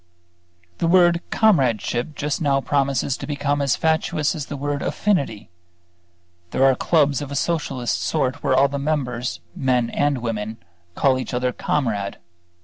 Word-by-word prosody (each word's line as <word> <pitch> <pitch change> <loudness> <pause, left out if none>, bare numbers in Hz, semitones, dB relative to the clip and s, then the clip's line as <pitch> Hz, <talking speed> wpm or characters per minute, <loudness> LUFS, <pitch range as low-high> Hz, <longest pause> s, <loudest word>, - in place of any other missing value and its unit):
The - - +1
word 175 -1 +5
comradeship 135 - +1
just 150 +2 -2
now 140 -3 +2
promises 135 -1 0
to - - -7
become 145 0 -1
as 140 -2 +2
fatuous 160 -2 0
as 150 -4 -5
the 145 - -5
word 145 +1 -2
"affinity." 140 - -1 1.0
There 130 - +1
are 135 - +6
clubs 145 0 +2
of 145 -1 -6
a - - -4
Socialist 135 -6 -1
sort 145 -3 -1
where 130 - +2
all 135 +2 +5
the 140 0 -4
members, 130 -5 -2
men 125 -3 +1
and 145 -1 +1
women, 110 -2 -4 0.4
call 130 -2 +2
each 130 - -4
other 125 0 0
"Comrade." 110 -9 -1
140 Hz, 150 wpm, -22 LUFS, 125-150 Hz, 1.0 s, are